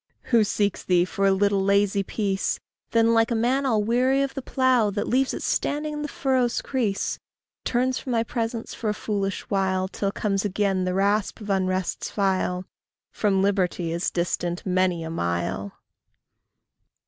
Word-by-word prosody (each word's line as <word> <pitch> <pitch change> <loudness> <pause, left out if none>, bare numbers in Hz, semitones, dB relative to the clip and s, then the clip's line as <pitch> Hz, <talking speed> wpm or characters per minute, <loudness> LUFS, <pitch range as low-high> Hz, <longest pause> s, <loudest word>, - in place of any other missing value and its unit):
Who 230 -2 +6
seeks 205 -1 0
thee 180 -1 +3
for 195 +1 0
a - - +5
little 200 0 +2
lazy 200 0 +3
peace, 195 -1 -1 0.3
Then, 230 0 +3
like 225 0 +3
a 235 - 0
man 255 +5 +1
all 220 -4 +2
weary 255 +5 +2
of 275 - -3
the 270 - -4
plough, 255 -4 +2
That 205 +1 -2
leaves 260 +1 +2
it - - -5
standing 300 +1 -1
in 295 - -4
the 295 - -2
furrow's 260 -4 0
crease, 225 -7 -1 0.5
Turns 255 +1 +1
from 260 - -5
thy 230 -1 +2
presence 230 -1 -3
for 220 - -3
a 210 - -1
foolish 200 -3 -2
while, 190 -1 +1
Till 200 +1 -2
comes 195 -1 -1
again 195 -2 0
the 180 0 -1
rasp 200 +1 +1
of 210 -2 -4
unrest's 185 -1 -1
file, 185 -2 0 0.5
From 195 -3 +1
liberty 185 -4 0
is 170 +2 0
distant 175 0 -2
many 185 -2 +1
a 160 - -5
mile. 85 - -2
200 Hz, 170 wpm, -25 LUFS, 185-235 Hz, 0.5 s, Who